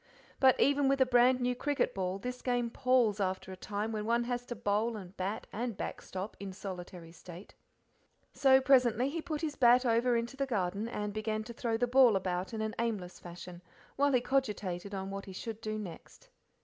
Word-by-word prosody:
But 260 -2 +5
even 285 0 +3
with 275 0 +2
a 260 - +6
brand 250 +1 +4
new 250 0 +1
cricket 285 +3 0
ball 185 0 -2
this 250 +4 -6
game 245 -2 0
palls 250 -5 +2
after 190 -1 -2
a - - -6
time 205 +3 -4
when 215 -1 -3
one 235 +2 +1
has 245 0 -3
to 240 - -5
bowl 215 +3 0
and 190 -1 -10
bat 195 +3 -3
and 230 -1 -3
backstop 190 +3 -5
in 195 -1 -6
solitary 180 -3 -8
state. 175 +3 -12 0.8
So 265 -1 +5
presently 255 -1 +4
he 330 +1 -3
put 310 -1 -4
his 305 -3 -2
bat 250 0 +5
over 235 +1 +3
into 235 +3 -3
the 275 0 -1
garden, 200 -2 -1
and 210 -3 -3
began 215 0 -2
to 235 - -9
throw 230 -1 -1
the 245 - +2
ball 245 -3 +5
about 185 0 -2
in 220 -1 -4
an 220 0 -2
aimless 210 -6 -3
fashion, 175 0 -10 0.3
while 285 +1 +3
he 250 -2 +3
cogitated 205 -8 -1
on 190 0 -4
what 195 0 -5
he 190 - -9
should 220 +3 -6
do 215 -1 -3
next. 210 - -10
225 Hz, 200 wpm, -32 LUFS, 195-250 Hz, 0.8 s, a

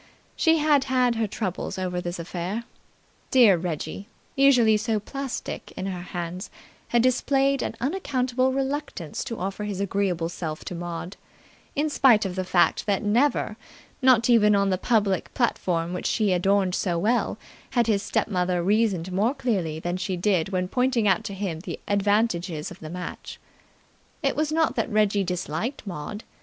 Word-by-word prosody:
She 325 -1 +4
had 295 -3 +3
had 255 -2 +2
her 225 -1 -1
troubles 190 -3 -4
over 180 -1 -2
this 175 0 -4
affair. 175 +6 -4 0.7
Dear 235 -7 +6
Reggie, 170 +3 -4 0.3
usually 250 -5 +5
so 215 0 0
plastic 275 +5 -5
in 185 - -3
her 185 -2 -4
hands, 175 0 -5 0.4
had 235 -1 +2
displayed 270 +2 +2
an - - -3
unaccountable 260 -4 0
reluctance 270 - -3
to 230 -4 -5
offer 195 +3 -4
his 205 -2 -4
agreeable 195 -4 0
self 160 -2 -5
to - - -5
Maud 175 +1 -6 0.6
in 300 +1 +1
spite 250 -8 +4
of 185 -2 -3
the 185 - -1
fact 180 +2 +2
that 200 -2 +1
never, 220 0 +1 0.4
not 255 -3 +5
even 210 -4 +5
on 200 -1 +2
the 185 - 0
public 205 -5 +1
platform 175 -8 0
which 180 - -2
she 210 -4 +2
adorned 190 +1 +2
so 180 -2 0
well, 220 +8 +1 0.4
had 240 - +5
his 210 -3 +1
step - - 0
mother 180 -3 0
reasoned 195 -3 +1
more 215 +9 +1
clearly 195 - -1
than 175 +2 -2
she 185 0 -2
did 180 -2 +1
when 185 -2 -1
pointing 250 0 +1
out 190 -3 +3
to 200 - -5
him 185 -5 -3
the 170 - -6
advantages 200 -6 0
of 180 - -11
the 155 - -8
match. 180 +2 -7 0.8
It - - +1
was 305 0 0
not 320 0 +1
that - - 0
Reggie 210 -2 +2
disliked 180 - -3
Maud. 195 +3 -6
200 Hz, 165 wpm, -25 LUFS, 180-240 Hz, 0.8 s, Dear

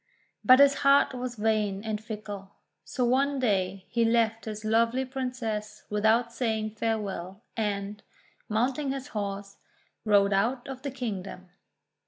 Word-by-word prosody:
But 255 0 +8
his 280 0 +7
heart 275 0 +5
was 250 -1 -4
vain 210 -2 0
and 215 -1 -3
fickle. 205 -3 -7 0.3
So 250 - -1
one 275 +3 +2
day 195 -6 0
he 235 +4 +1
left 225 -1 +2
his 215 -1 -6
lovely 230 +4 +2
Princess 250 -5 -4
without 220 +3 +2
saying 220 -3 -1
farewell, 210 -3 -3
and, 205 -2 -2 0.5
mounting 255 +6 0
his 275 +1 -5
horse, 200 -3 -4 0.5
rode 200 -2 +4
out 235 +6 0
of 265 -1 -7
the 280 - -3
kingdom. 200 -8 -5
220 Hz, 135 wpm, -28 LUFS, 205-250 Hz, 0.5 s, But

